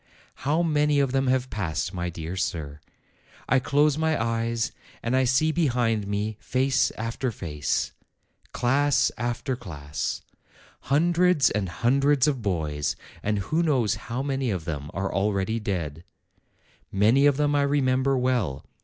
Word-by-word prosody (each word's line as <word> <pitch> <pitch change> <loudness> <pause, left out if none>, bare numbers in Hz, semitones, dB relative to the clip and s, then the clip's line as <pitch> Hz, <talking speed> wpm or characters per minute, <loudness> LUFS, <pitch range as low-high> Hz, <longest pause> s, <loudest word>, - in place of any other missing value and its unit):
How 155 +5 +1
many 150 -2 +2
of 135 -2 +2
them 135 0 +1
have 130 0 +1
passed, 85 -2 -2
my 90 -1 -2
dear 85 +1 -6
sir! 75 -4 -3 0.7
I 135 - +4
close 145 +3 +2
my 160 -1 +1
eyes, 115 0 -1 0.3
and 115 +2 0
I 130 0 +3
see 135 +6 +3
behind 120 -10 +1
me 105 +1 -2
face 130 +1 +1
after 115 +3 -2
face, 75 -7 -2 0.6
class 140 +3 +2
after 120 +3 -2
class, 75 - -5 0.7
hundreds 170 +1 +3
and 100 -4 -1
hundreds 135 - +2
of 135 -5 0
boys, 80 -7 -1 0.3
and 105 0 0
who 155 +12 0
knows 130 - +2 0.2
how 125 +3 -2
many 135 -2 -1
of 90 -6 -3
them 75 -3 -4
are 95 +2 -3
already 100 +2 0
dead! 85 -7 -3 0.9
Many 115 +8 +4
of 140 -2 +3
them 145 -1 +2
I 145 - +3
remember 135 -1 +2
well. 125 - 0
120 Hz, 145 wpm, -26 LUFS, 95-140 Hz, 0.9 s, I